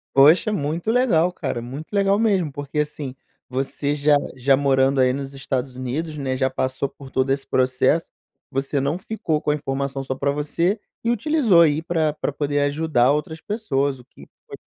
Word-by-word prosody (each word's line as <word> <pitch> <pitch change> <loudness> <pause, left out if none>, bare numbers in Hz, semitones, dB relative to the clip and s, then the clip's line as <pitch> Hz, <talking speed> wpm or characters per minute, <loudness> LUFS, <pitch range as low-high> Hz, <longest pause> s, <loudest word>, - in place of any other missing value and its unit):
Poxa, 155 +10 +6
muito 165 +2 -2
legal 195 -9 +3
cara, 120 - -3
muito 140 - -8
legal 200 0 +3
mesmo. 195 -8 +2
Porque, 145 +1 -3
assim, 150 -3 -4 0.3
você 135 +2 -2
já 145 0 +3 0.2
já 135 +1 +3
morando 135 -1 +2
aí 130 0 +4
nos 135 0 -5
Estados 130 -1 -3
Unidos, 150 +5 -4
né, 130 -2 -2
já 130 0 +1
passou 130 +1 -2
por 135 -1 -13
todo 130 +1 0
esse 135 0 -1
processo, 130 +5 +1 0.4
você 135 0 -1
não 145 +6 -1
ficou 180 -7 -2
com 150 - -1
a 150 - +3
informação 140 -1 -3
só 130 0 -3
para 140 +2 0
você 170 +8 0 0.2
e 230 - +2
utilizou 240 - +3
aí 155 -1 +4
pra 160 -3 0
pra 150 - -3
poder 145 0 -1
ajudar 145 -3 +2
outras 155 +2 -3
pessoas 140 - -1
o 125 - -15
que - - -16 0.2
foi - - -9
145 Hz, 185 wpm, -22 LUFS, 135-165 Hz, 0.4 s, Poxa